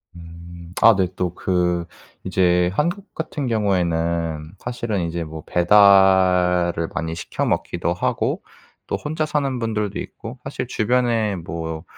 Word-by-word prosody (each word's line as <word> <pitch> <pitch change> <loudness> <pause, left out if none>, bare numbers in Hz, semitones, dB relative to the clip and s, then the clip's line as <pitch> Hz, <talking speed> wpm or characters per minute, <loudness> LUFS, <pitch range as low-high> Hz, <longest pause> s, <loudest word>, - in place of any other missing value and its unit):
음. 85 +1 -11
아 115 -1 +8
네. 95 -1 +1
또 90 -2 -2
그 90 -2 0 0.4
이제 90 -1 +2
한국 175 - -2
같은 150 -4 -4
경우에는 85 -6 0
사실은 115 -5 -3
이제 85 0 -3
뭐 80 -1 -8
배달을 90 -2 +4
많이 80 0 -2
시켜 85 - -3
먹기도 - - -1
하고 - - -1 0.4
또 - - -1
혼자 155 +1 -2
사는 140 -4 -1
분들도 105 -3 -2
있고 115 +3 -8
사실 135 -1 -4
주변에 115 -3 +1
뭐 80 -1 -5
90 Hz, 245 characters per minute, -21 LUFS, 85-115 Hz, 0.4 s, 아